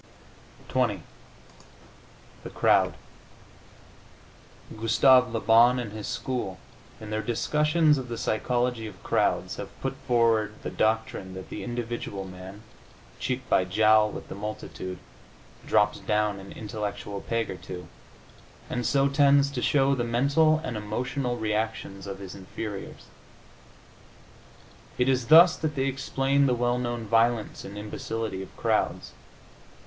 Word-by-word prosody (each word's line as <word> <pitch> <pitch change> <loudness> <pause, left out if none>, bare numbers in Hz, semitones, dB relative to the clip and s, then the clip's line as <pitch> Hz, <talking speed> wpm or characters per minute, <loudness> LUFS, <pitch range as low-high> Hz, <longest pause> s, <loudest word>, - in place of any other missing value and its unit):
XX - - 0 1.4
THE - - -7
CROWD - - +3 1.8
Gustave 125 +3 +4
Le 115 - -1
Bon 115 +3 +5
and 120 -4 -4
his 105 -1 -6
school, 115 -5 -3 0.4
in 110 -1 -8
their 110 0 -1
discussions 150 +5 +2
of 130 - -6
the 115 - -4
psychology 120 +1 -1
of 95 -4 -12
crowds, - - 0
have - - -6
put - - -3
forward 115 -3 +2
the - - -4
doctrine 110 -4 -1
that 95 - -9
the - - -5
individual 120 -5 -4
man, 95 +3 -10 0.6
cheek 130 0 -3
by 95 - +3
jowl 110 +3 +4
with - - -8
the - - -7
multitude, 100 -2 -6 0.7
drops 105 0 +3
down 105 -1 0
an 95 0 -11
intellectual 105 -2 -5
peg 115 -1 -2
or 95 - -6
two, 90 -1 -8 0.8
and 125 -1 -1
so 140 -1 +3
tends 140 0 +4
to 130 -3 -3
show 140 0 +3
the 125 -3 0
mental 140 +7 +3
and 125 -8 -4
emotional 125 +4 -2
reactions 105 -3 -3
of 100 -1 -5
his 95 -2 -8
inferiors. 100 +1 -7 1.9
It 125 - +2
is 130 -3 +1
thus 170 +2 +8
that 155 -1 -2
they 135 -1 0
explain 135 +1 +1
the 125 - +2
well 120 +1 0
known 120 -2 -3
violence 115 +1 +1
and 100 +1 -9
imbecility 105 -1 -4
of 95 - -11
crowds. - - 0
115 Hz, 135 wpm, -27 LUFS, 105-130 Hz, 1.9 s, thus